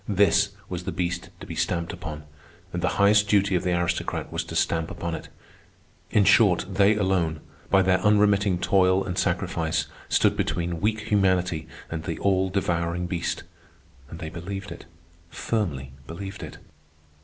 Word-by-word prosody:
This 100 0 +4 0.2
was 90 -1 -5
the - - -2
beast 85 -1 -3
to - - -7
be 90 - -7
stamped 85 +2 -1
upon, 80 -5 -7 0.5
and 90 - -2
the 90 - 0
highest 105 +1 +5
duty 100 -1 +3
of 90 - +2
the 90 -1 0
aristocrat 85 0 -2
was - - -1
to - - -7
stamp 80 0 +1
upon 85 -1 -4
it. 80 - -6 0.8
In 105 - +3
short, 100 -3 +5
they 100 +2 +3
alone, 95 -6 0 0.3
by 95 -1 +5
their 95 0 +3
unremitting 105 -2 +3
toil 95 +1 +3
and 90 -2 -4
sacrifice, 80 -3 0 0.2
stood - - +3
between 85 -1 -2
weak 110 +1 +1
humanity 95 -6 +1 0.2
and 80 -1 -3
the 85 -3 -3
all 95 -1 +1
devouring 90 -2 -1
beast; 85 -1 -2 0.7
and 80 - -8
they 80 -2 -6
believed 95 +4 -6
it, - - -9 0.4
firmly 80 - -2 0.2
believed 95 +4 -7
it. - - -8
95 Hz, 160 wpm, -25 LUFS, 85-100 Hz, 0.8 s, highest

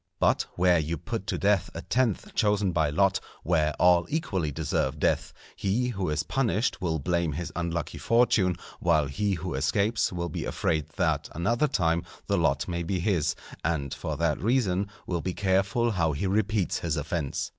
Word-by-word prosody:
But - - +2
where 90 -1 +4
you 80 +2 -2
put 110 -4 -5
to - - -1
death 100 -2 +2
a - - -5
tenth 120 -5 0
chosen 105 -3 +2
by 80 -3 +1
lot, 95 +6 +2 0.2
where 80 -3 +2
all 85 +1 +4
equally 95 - -1
deserve 75 -2 -1
death, - - +1 0.2
he 115 +6 0
who 95 -8 -2
is 75 -1 0
punished 120 - 0
will 80 -3 0
blame 85 +1 0
his 85 +4 -4
unlucky 85 -2 -3
fortune, 115 -6 +3 0.2
while 80 -4 +3
he 100 +9 -1
who 90 +1 -4
escapes 100 - +1
will 85 -1 -3
be 80 - -4
afraid 80 -2 -1
that 80 -5 0
another 115 - +1
time 85 - +1 0.2
the - - +1
lot 70 0 +1
may 85 -1 -2
be 90 +2 -1
his, 85 -4 +1 0.3
and 70 -4 -1
for 75 -2 -4
that 80 -2 0
reason 100 -4 +1 0.2
will 85 -2 -2
be 90 +1 -3
careful 100 +4 +1
how 85 -6 +1
he 70 - -2
repeats 105 0 +1
his 80 -2 -1
offence. 75 -1 -2
90 Hz, 175 wpm, -27 LUFS, 80-100 Hz, 0.3 s, where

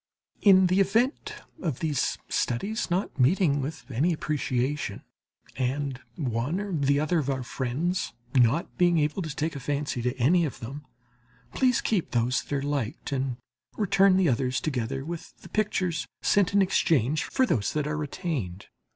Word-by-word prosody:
In 190 -2 +7
the 185 +2 +3
event 225 - +1 0.3
of 150 - -2
these 150 -3 0
studies 200 - -1
not 180 -4 -1
meeting 145 +1 +3
with 150 +1 -5
any 150 +9 +2
appreciation, 140 -5 -2 0.5
and 135 0 -2
one 130 - -1
or 205 -2 -4
the 140 -1 +2
other 155 +3 +1
of 140 -2 -2
our 130 -2 -1
friends 140 +10 -2 0.2
not 130 +9 +2
being 175 -1 +4
able 150 +5 +1
to 155 -5 -5
take 155 +1 -2
a - - -4
fancy 140 -1 -2
to 125 +2 -1
any 165 +8 +4
of 150 - -3
them, 135 +4 -8 0.7
please 255 -2 +2
keep 200 -7 0
those 120 +2 +1
that - - -17
are 140 - -1
liked 140 -5 -3
and 130 -2 -1 0.4
return 195 -2 +4
the 190 -2 +3
others 130 -1 +1
together 135 -2 -2
with 170 0 -7
the - - -12
pictures 190 -5 -1 0.2
sent 200 -2 +3
in 200 -1 +4
exchange 155 - +2
for 260 - +2
those 105 - 0
that 150 -1 0
are 150 0 -2
retained. 140 - -4
150 Hz, 165 wpm, -27 LUFS, 130-180 Hz, 0.7 s, In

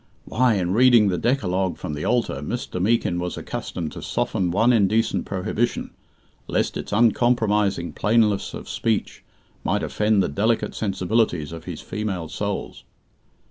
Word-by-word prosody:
Why, 125 -1 +2
in 90 -2 0
reading 120 -2 +6
the 90 - -1
Decalogue 95 - 0
from 75 - -5
the 75 +1 -4
altar, 120 - +1
Mr. 90 - -4
Meekin 100 -4 +1
was 90 0 -3
accustomed 80 -3 -5
to - - -8
soften 90 -2 -1
one 115 +8 +3
indecent 110 +1 +2
prohibition, 110 +5 -2 0.6
lest - - 0
its - - -5
uncompromising 105 -4 +2
plainness 105 -2 +1
of - - -8
speech 110 -3 -2 0.4
might - - 0
offend 105 -2 +2
the - - 0
delicate 105 +6 0
sensibilities 95 -5 0
of 85 0 -8
his 85 -4 -6
female 95 -6 -4
souls! - - -4
105 Hz, 140 wpm, -23 LUFS, 90-115 Hz, 0.6 s, reading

